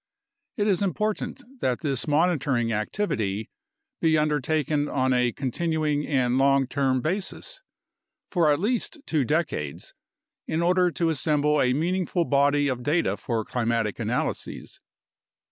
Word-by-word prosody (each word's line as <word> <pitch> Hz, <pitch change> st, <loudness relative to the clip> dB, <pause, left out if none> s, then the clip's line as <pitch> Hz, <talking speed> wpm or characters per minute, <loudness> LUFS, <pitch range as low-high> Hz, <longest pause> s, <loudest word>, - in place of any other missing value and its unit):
It 205 Hz, -, +1 dB
is 200 Hz, -3 st, +2 dB
important 210 Hz, -, -2 dB, 0.2 s
that 125 Hz, -, -1 dB
this 140 Hz, -4 st, -1 dB
monitoring 145 Hz, -7 st, +1 dB
activity 105 Hz, -, -2 dB, 0.5 s
be 160 Hz, -1 st, +3 dB
undertaken 150 Hz, 0 st, 0 dB
on 130 Hz, -1 st, +1 dB
a 125 Hz, -1 st, +2 dB
continuing 150 Hz, +3 st, -1 dB
and 130 Hz, -3 st, +1 dB
long 135 Hz, 0 st, +4 dB
term 130 Hz, -1 st, 0 dB
basis 200 Hz, -, -3 dB, 0.7 s
for 170 Hz, -5 st, +3 dB
at 145 Hz, -, +2 dB
least 235 Hz, -, -1 dB
two 155 Hz, -4 st, +1 dB
decades 150 Hz, -, -2 dB, 0.5 s
in 160 Hz, +2 st, 0 dB
order 180 Hz, +1 st, +3 dB
to 170 Hz, -1 st, 0 dB
assemble 150 Hz, 0 st, +2 dB
a 125 Hz, 0 st, +3 dB
meaningful 175 Hz, +3 st, 0 dB
body 145 Hz, 0 st, +3 dB
of 130 Hz, -2 st, -2 dB
data 145 Hz, -, +1 dB
for 110 Hz, +1 st, -3 dB
climatic 115 Hz, -4 st, -1 dB
analyses. -, -, -3 dB
145 Hz, 130 wpm, -25 LUFS, 130-170 Hz, 0.7 s, long